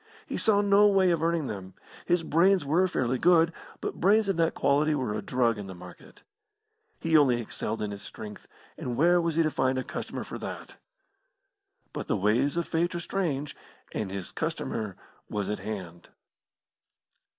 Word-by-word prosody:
He - - -5
saw 205 -2 +3
no 205 0 +5
way 190 -3 +4
of 165 -2 0
earning 165 -2 +1
them. 95 -5 -6 0.3
His 175 -1 +2
brains 175 +2 +3
were 170 +6 +3
fairly 130 -7 -1
good, 165 -1 +4 0.3
but - - -5
brains 205 +2 +4
of 195 - 0
that 165 -1 +2
quality 150 +2 +2
were 130 -7 -1
a 105 - -3
drug 120 -4 +1
in 100 - -6
the 95 - -8
market. 90 0 -14 0.8
He 165 -1 +1
only 135 -6 +5
excelled 110 -1 -3
in 105 - -3
his 100 0 -7
strength, 105 0 -9 0.3
and 120 -1 -3
where 175 +3 +4
was 165 -2 -1
he 165 - +4
to 155 - 0
find 130 -1 +1
a 130 - -1
customer - - -5
for - - -7
that? - - -7 1.2
But - - -5
the - - +1
ways 120 - +2
of 170 - -1
Fate 170 +2 0
are - - -1
strange, 155 -6 -2 0.4
and 105 - -3
his 95 -2 -5
customer 105 -4 -3 0.3
was 105 -1 -2
at 105 - -3
hand. 90 -5 -7
145 Hz, 180 wpm, -28 LUFS, 110-170 Hz, 1.2 s, no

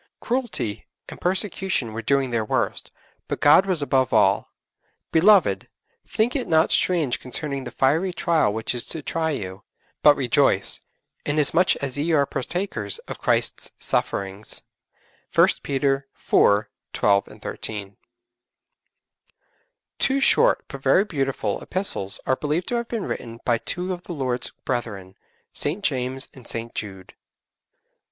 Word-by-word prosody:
Cruelty 240 - -3 0.2
and - - -11
persecution 185 - -1
were 115 - -4
doing 135 +1 +1
their 115 -2 0
worst, 105 - -1 0.4
but - - -3
God 150 +7 +6
was 175 -6 0
above 130 -3 +1
all. - - +3 0.6
'_Beloved, 165 - +4 0.4
think 230 +5 0
it 265 - -1
not 160 0 +3
strange 165 -9 +1
concerning 135 +1 -4
the - - -5
fiery 160 +8 +1
trial 165 - +1
which 110 +1 -2
is 120 - 0
to 160 - -4
try 160 +2 -1
you... 95 -9 -5 0.4
but 150 -1 +7
rejoice, 130 -5 +3 0.4
inasmuch 155 +5 +3
as 140 0 -2
ye 165 +3 0
are 145 -2 +4
partakers 130 - -3
of - - -7
Christ's - - 0
sufferings._' 100 +2 -2 0.7
(1 - - +7
Peter 135 0 0
iv. 105 +1 +3 0.3
12, 100 -1 +3
13.) 100 -2 -6 2.0
Two 270 +1 +2
short, 475 - +3
but - - -9
very 200 - +4
beautiful, 135 -8 -2
epistles 180 - +1
are 130 - +2
believed 150 +5 -2
to 245 - -1
have 235 0 -3
been 230 -4 -3
written 115 0 -6
by 120 -2 +2
two 180 +7 -3
of 175 0 -9
the 175 - -6
Lord's 130 -5 -1 0.2
brethren, 105 -7 -3 0.4
St. 165 +8 -2
James 130 -3 -1
and 130 -3 -14
St. 115 0 -3
Jude. 95 -3 -7
140 Hz, 135 wpm, -23 LUFS, 115-175 Hz, 2.0 s, but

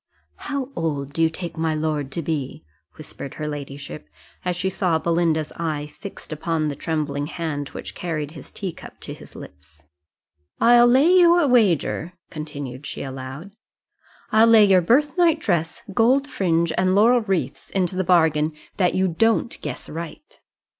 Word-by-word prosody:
"How 280 -2 -2
old 145 -4 -2
do 165 - -1
you 165 - +4
take 170 +1 -7
my 160 -1 0
lord 150 -3 -2
to 170 - -3
be?" 140 - -4 0.3
whispered 140 - -9
her 150 - -4
ladyship, 140 - -7 0.3
as 180 -1 -1
she 180 +2 -2
saw 180 -3 +1
Belinda's 165 -2 0
eye 155 -3 -2
fixed 165 +1 -9
upon 155 0 -1
the 145 - -4
trembling 145 -2 -2
hand 150 -4 -4
which - - -8
carried 155 -4 -4
his 155 -4 -11
teacup 190 -5 -7
to - - -6
his - - -13
lips: 75 +2 -13 0.8
"I'll 240 +1 +6
lay 260 +4 +5
you 350 -1 +6
a 335 -4 +3
wager," 185 - +2 0.2
continued 145 -4 -7
she - - -5
aloud 135 +7 -7 0.8
"I'll 220 +1 +6
lay 225 -2 +7
your 190 -2 +5
birth 285 - +2
night 335 -3 +5
dress, 170 - -1
gold 260 +7 +3
fringe, 170 - 0
and 185 +1 +2
laurel 235 +4 +5
wreaths 180 - -2
into 185 -1 -1
the 185 - 0
bargain, 160 -3 +3 0.2
that 180 -3 +2
you 190 0 +2
don't 225 +7 +1
guess 150 -4 -5
right." 170 - -8
165 Hz, 160 wpm, -23 LUFS, 150-200 Hz, 0.8 s, lay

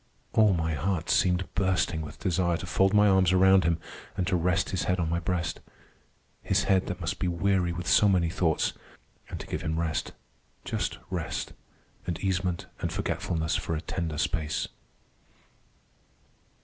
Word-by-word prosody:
All 110 -3 +5
my 80 -1 -1
heart 80 +3 -1
seemed 90 0 +2
bursting 95 -4 +1
with 75 -1 -8
desire 85 -3 +1
to 95 - -6
fold 95 +2 +2
my 105 0 +5
arms 95 -2 +4
around 95 -1 +5
him, 85 -1 +2 0.4
and 90 - 0
to 90 - +1
rest 90 +2 +1
his 95 - -1
head 90 0 +1
on 80 -2 0
my 85 - +1
breast—his 85 -1 -4
head 95 -1 +2
that 90 -2 -4
must 80 -2 -3
be 90 - 0
weary 90 0 +1
with 90 +1 -5
so 105 - +5
many 90 -3 +3
thoughts; 80 -3 +1 0.6
and - - -6
to - - -7
give - - -4
him 80 +1 -2
rest—just 70 -6 -4
rest—and 85 - -6
easement 90 -2 -1
and - - -2
forgetfulness 80 -2 -1
for 80 - -2
a 75 - -3
tender 85 -4 -3
space. 80 +1 -1
90 Hz, 155 wpm, -28 LUFS, 80-95 Hz, 0.6 s, All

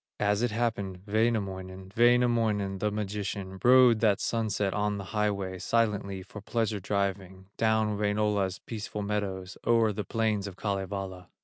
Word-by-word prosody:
As 105 0 +2
it 120 - +2
happened, 105 -5 -2
Wainamoinen, 95 -4 -1
Wainamoinen, 115 -5 +3
the 105 - +1
magician, 100 -2 -4
Rode 125 -2 +7
that 105 -3 +3
sunset 105 -4 -1
on 105 0 0
the 100 - -5
highway, 100 -3 -1
Silently 100 -4 0
for 105 +2 -10
pleasure 110 0 -1
driving 95 -1 -3
Down 110 -2 +1
Wainola's 105 -2 +1
peaceful 105 -2 -6
meadows, 95 -2 -3
O'er 115 -2 +3
the 105 +1 -3
plains 105 0 0
of 95 - -8
Kalevala. 95 -2 -4
105 Hz, 135 wpm, -29 LUFS, 95-110 Hz, -, Rode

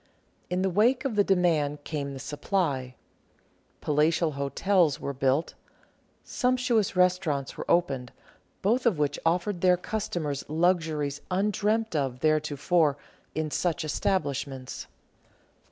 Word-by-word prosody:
In 180 +1 0
the 190 - +2
wake 240 - +3
of 255 -5 -1
the 205 - +4
demand 160 -7 +1
came 140 -3 -4
the - - -7
supply. 140 -3 -2 0.9
Palatial 155 +2 +2
hotels 150 +4 +1
were 140 - -4
built, 135 +3 0 0.7
sumptuous 250 -5 +1
restaurants 180 -6 +1
were - - -7
opened, 135 -8 +1 0.5
both 235 +5 +2
of 205 -9 +2
which 145 -1 0
offered 175 +2 0
their 180 -1 +5
customers 175 -8 -3
luxuries 155 -3 0
undreamt 210 +2 0
of 135 -4 -1
theretofore 155 0 +2 0.4
in 155 -1 -2
such 170 -1 -1
establishments. 140 -6 -2
165 Hz, 115 wpm, -27 LUFS, 145-190 Hz, 0.9 s, their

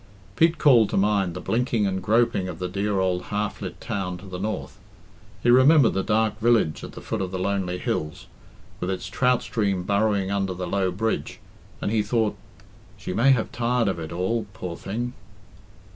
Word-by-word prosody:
Pete 165 +5 +3
called 120 -9 +5
to - - -1
mind 95 -3 +1
the - - -4
blinking 115 +2 0
and 95 -1 -1
groping 110 -2 +2
of 85 - -6
the 90 - -3
dear 100 +2 -1
old 90 -1 0
half 105 0 -3
lit - - -6
town 90 -3 -3
to 95 - -13
the 90 -2 -7
north; 105 0 -4 0.6
he 120 - +5
remembered 130 0 +6
the 95 - 0
dark 110 +1 +1
village 115 -9 +2
at - - -8
the - - -9
foot 110 -3 -3
of 95 - -2
the 95 - -4
lonely 95 -1 -1
hills, 75 -3 -3 0.5
with 90 - -3
its 95 - -3
trout 125 -1 +1
stream 100 -5 -1
burrowing 100 0 +1
under 95 -2 -1
the 90 0 -4
low 95 +1 0
bridge, 110 +5 -2 0.4
and - - 0
he 110 -1 +2
thought, 110 0 0 0.6
"She - - -5
may 120 +7 +3
have 125 -5 +2
tired 120 -1 0
of 95 -3 -1
it 80 0 -6
all, 95 +7 -1
poor 90 -3 -6
thing!" 120 +8 -4
100 Hz, 190 wpm, -24 LUFS, 95-115 Hz, 0.6 s, remembered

